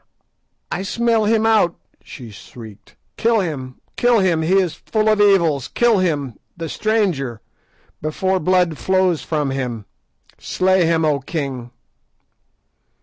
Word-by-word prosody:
"I 175 - -2
smell 230 +2 +1
him 220 +1 +2
out," 215 -6 +3 0.3
she 120 -5 -11
shrieked. 105 -1 -13 0.2
"Kill 230 -1 +2
him, 135 -9 -5 0.2
kill 245 -1 +3
him, 180 -5 +2
he 180 +5 +2
is 180 -4 +1
full 215 +6 -2
of 215 -1 +3
evil; 170 -8 +3
kill 235 -4 +3
him, 145 - -2 0.2
the 165 -1 -5
stranger, 175 - -1 0.6
before 185 +5 -1
blood 180 -2 +1
flows 185 -3 +1
from 150 -4 -2
him. 125 -5 -4 0.5
Slay 185 -1 +1
him, 165 -1 +2
O 150 -2 +1
king." 135 -4 -5
170 Hz, 130 wpm, -19 LUFS, 140-200 Hz, 0.6 s, out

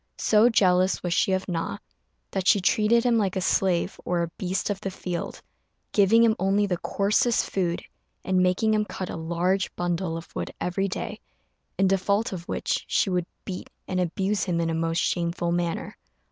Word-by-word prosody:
So 220 +2 +4
jealous 185 -4 +3
was 175 -1 0
she 190 - +2
of 190 0 0
Na, 175 +2 -2 0.5
that 190 -1 -2
she 205 - +6
treated 215 +5 +3
him 240 -2 +3
like 195 -3 0
a - - 0
slave 185 0 +1
or 175 -1 0
a 170 - -4
beast 190 +2 -1
of 195 - -4
the 195 - -2
field, 180 -2 -5 0.5
giving 215 +3 +5
him 225 -2 +4
only 195 +2 +2
the 180 -3 -2
coarsest 210 +4 +1
food, 175 -3 -1 0.4
and 185 -1 +2
making 185 +4 +2
him 215 0 +2
cut 190 -3 -5
a - - -5
large 175 +4 0
bundle 175 -1 -1
of 165 - -11
wood - - -3
every 195 +2 -1
day, 185 - -5 0.6
in 195 - +3
default 200 +3 +1
of 170 -2 -7
which - - -1
she 195 - +1
would 180 -1 0 0.2
beat 185 -2 -6 0.2
and 185 - -1
abuse 190 +3 0
him 175 -3 0
in 165 -1 0
a - - -1
most 165 0 -1
shameful 170 0 0
manner. 170 -1 -2
185 Hz, 190 wpm, -26 LUFS, 175-200 Hz, 0.6 s, she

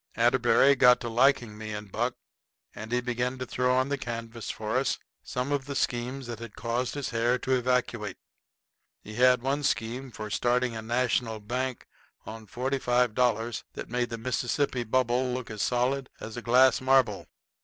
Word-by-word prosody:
Atterbury 140 +1 +4
got 125 -1 +6
to 120 - -3
liking 120 -2 +3
me 110 -1 -5
and 105 -1 -7
Buck 120 +4 -1 0.6
and 110 +2 -8
he 125 0 +1
begun 125 +1 -2
to 130 - -4
throw 125 +1 +1
on 130 +1 +1
the 140 -1 -1
canvas 115 -2 -6
for 110 +3 -2
us 135 0 +1 0.2
some 125 +3 -3
of 140 -2 0
the 140 0 -5
schemes 125 +2 -2
that 120 -2 -6
had 115 -2 -9
caused 120 +3 -2
his 145 -2 -3
hair 120 +2 +2
to 130 - -4
evacuate. 120 -5 0 0.9
He 110 - -9
had 125 +1 +4
one 140 +2 0
scheme 125 0 -1
for 110 -2 -7
starting 125 +1 +1
a 110 - -4
National 115 -1 0
bank 125 +4 -3 0.4
on 110 0 -9
$45 125 -2 0
that - - -7
made 120 0 -1
the 115 - -4
Mississippi 125 +2 -1
Bubble 125 +2 +1
look 125 -3 -5
as 105 -2 -4
solid 130 +2 0
as 110 - -7
a 120 - -5
glass 125 +2 +4
marble. 130 -6 +2
125 Hz, 175 wpm, -28 LUFS, 115-130 Hz, 0.9 s, got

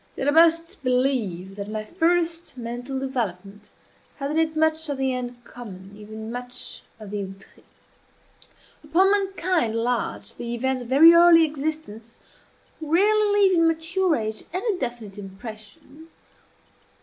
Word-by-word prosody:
Yet 270 - -2
I - - +5
must 330 +1 +3
believe 250 -8 0
that 200 0 -5
my 215 0 -4
first 335 - 0
mental 245 +3 -5
development 210 -6 -4 0.5
had 275 0 -4
in 315 - +1
it 320 -1 +1
much 315 0 +1
of 285 - -2
the 265 -1 0
uncommon 240 -6 -8
even 220 +1 -8
much 245 +1 -6 0.2
of 210 -2 -10
the 205 -1 -3
outré. 195 +1 -12 1.2
Upon 350 +6 +3
mankind 370 - 0
at - - -2
large 240 0 -2
the 235 0 -5
events 260 +2 -1
of 240 - -9
very 315 +6 +8
early 335 -1 +7
existence 290 -7 -5 0.6
rarely 410 +7 +3
leave 380 -2 +5
in 330 - +4
mature 330 +2 +1
age 215 -3 -4
any 390 +4 -1
definite 235 -5 -5
impression. 215 +9 -11
265 Hz, 135 wpm, -24 LUFS, 220-325 Hz, 1.2 s, very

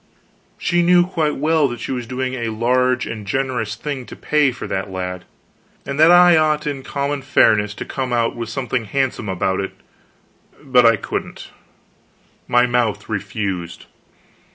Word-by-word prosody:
She 175 -1 +1
knew 175 0 +5
quite 160 -5 -1
well 155 0 +2
that 120 -2 -6
she - - -5
was 125 -3 -4
doing 130 +1 -3
a 120 -3 -3
large 125 +3 +1
and 110 -2 -6
generous 120 -2 -2
thing 140 -3 -5
to - - -9
pay 150 -3 +2
for 125 - -8
that 95 +1 -3
lad, 90 -1 -5 0.6
and 140 +1 -4
that 160 +2 +7
I 175 0 +7
ought 155 -1 +1
in 145 -2 -3
common 140 +1 -3
fairness 105 -6 +3
to - - -6
come 130 -2 -4
out 115 -1 0
with 115 -1 -5
something 125 -1 -2
handsome 125 -2 -2
about 95 0 -1
it, 100 - -4 0.9
but 125 -4 +4
I 115 - +5
couldn't 100 - -6 1.0
my 120 0 +4
mouth 120 -3 -1
refused. 100 -4 -4
125 Hz, 160 wpm, -20 LUFS, 110-140 Hz, 1.0 s, that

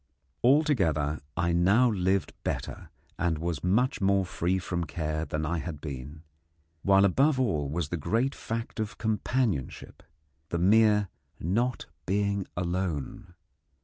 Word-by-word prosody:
Altogether, 95 - +3 0.2
I 85 -1 +1
now 100 +8 +4
lived 95 -1 0
better - - -4 0.3
and 85 -2 +1
was 85 -2 -3
much 110 +9 +1
more 100 0 +3
free 90 +1 -1
from 85 -2 -2
care 80 +1 -3
than 75 0 -3
I 85 +2 -1
had 80 -2 -5
been; 75 +2 -7 0.6
while 100 +2 +5
above 135 - +3
all 80 - 0
was 80 0 -2
the 85 - -2
great 115 - 0
fact 115 0 -5
of 110 -1 -3
companionship 110 - -2 0.5
the 85 - -1
mere 105 +2 +4 0.3
not 115 +9 0 0.2
being 100 0 0
alone. 90 -1 -3
90 Hz, 130 wpm, -28 LUFS, 80-110 Hz, 0.6 s, while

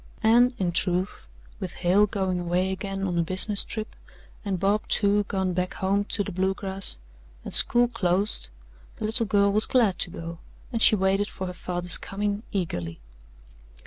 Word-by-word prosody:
And, 240 +3 +4
in 180 -3 -1
truth, 180 - -1 0.3
with 185 -2 -5
Hale 190 +4 +2
going 190 -3 -2
away 175 +2 -1
again 195 0 -4
on 175 -3 -1
a - - +4
business 190 +4 +3
trip 215 -1 -6 0.5
and 195 -4 -2
Bob, 200 +3 0
too, 205 0 +2
gone 190 -2 -1
back 180 +1 -2
home 200 +2 0
to 205 - -1
the 200 - -6
Bluegrass, 190 - 0 0.5
and - - -6
school 240 0 +5
closed, 200 - -1 0.5
the - - -5
little 225 +1 +1
girl 200 -1 +3
was 215 +2 +2
glad 225 -7 +2
to - - +2
go, 165 0 -8 0.3
and 230 - -1
she 215 - +8
waited 195 +1 +1
for 190 - -6
her 180 - -5
father's 180 0 -1
coming 205 +1 -3
eagerly. 90 - -4
195 Hz, 170 wpm, -25 LUFS, 180-205 Hz, 0.5 s, she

